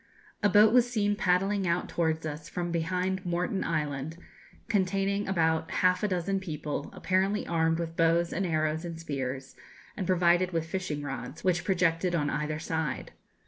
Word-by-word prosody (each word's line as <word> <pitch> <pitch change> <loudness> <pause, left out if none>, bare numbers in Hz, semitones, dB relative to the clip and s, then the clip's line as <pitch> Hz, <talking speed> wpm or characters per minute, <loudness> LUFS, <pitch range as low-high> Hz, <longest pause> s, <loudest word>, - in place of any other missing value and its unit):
A 205 - +4
boat 210 +3 +6
was 245 -1 +5
seen 205 -4 +1
paddling 195 +1 +1
out 170 +1 0
towards 160 -1 -1
us 155 +1 -6
from 175 -1 -3
behind 180 +3 -1
Moreton 180 +2 -1
Island, 150 -1 -2 0.5
containing 200 -1 0
about 160 -4 +1
half 180 0 +2
a 210 - +1
dozen 190 +1 0
people, 150 -5 -4
apparently 195 +2 0
armed 165 -1 +1
with 165 -1 -4
bows 170 +1 +2
and 195 - -1
arrows 155 -2 0
and 170 -2 -6
spears, 135 -4 -4 0.4
and 190 - -3
provided 180 0 +3
with 165 -1 0
fishing 160 -4 -3
rods, 135 0 -6
which 180 -2 +2
projected 175 -1 +1
on 145 -3 0
either 150 0 -2
side. 160 -3 -3
170 Hz, 160 wpm, -29 LUFS, 160-190 Hz, 0.5 s, boat